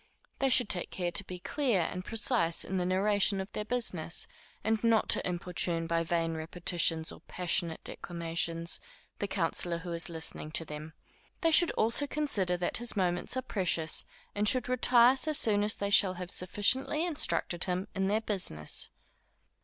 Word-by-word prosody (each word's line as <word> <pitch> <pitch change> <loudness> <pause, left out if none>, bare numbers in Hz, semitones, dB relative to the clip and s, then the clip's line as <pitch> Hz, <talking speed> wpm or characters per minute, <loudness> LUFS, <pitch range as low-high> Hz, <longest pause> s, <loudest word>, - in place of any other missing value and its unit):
They 270 - +2
should 245 -2 +4
take 180 -3 +1
care 175 -2 -3
to 200 - 0
be 185 -1 -8
clear 240 0 0
and 180 +2 -3
precise 220 -5 +2
in 190 - -3
the 180 -1 -1
narration 200 +1 +2
of 190 +1 -6
their 210 - -4
business, 210 -8 -1 0.4
and 220 0 0
not 230 -1 +2
to - - +1
importune 175 -1 -2
by 165 0 0
vain 165 0 -1
repetitions 165 0 0
or - - -13
passionate 175 -2 -1
declamations, 170 -1 -3 0.4
the 205 - -2
counsellor 175 -2 -1
who 170 +1 -6
is 170 +1 -3
listening 160 -2 -4
to 165 - -1
them. 150 +1 -8 0.5
They 330 -2 +2
should 340 +2 +9
also 230 +6 +1
consider 205 -13 0
that 175 - -1
his 240 -2 -2
moments 180 +5 0
are 260 - -2
precious, 175 -8 0 0.3
and 210 0 +3
should 255 -1 +1
retire 250 0 +5
so 310 +3 +2
soon 215 -7 +3
as 210 +1 +2
they 200 0 -3
shall 190 -2 +4
have 180 0 -6
sufficiently 260 - +2
instructed 285 - 0
him 185 0 -2
in 195 0 -1
their 210 +3 +1
business. 185 - -3
185 Hz, 170 wpm, -30 LUFS, 170-220 Hz, 0.5 s, should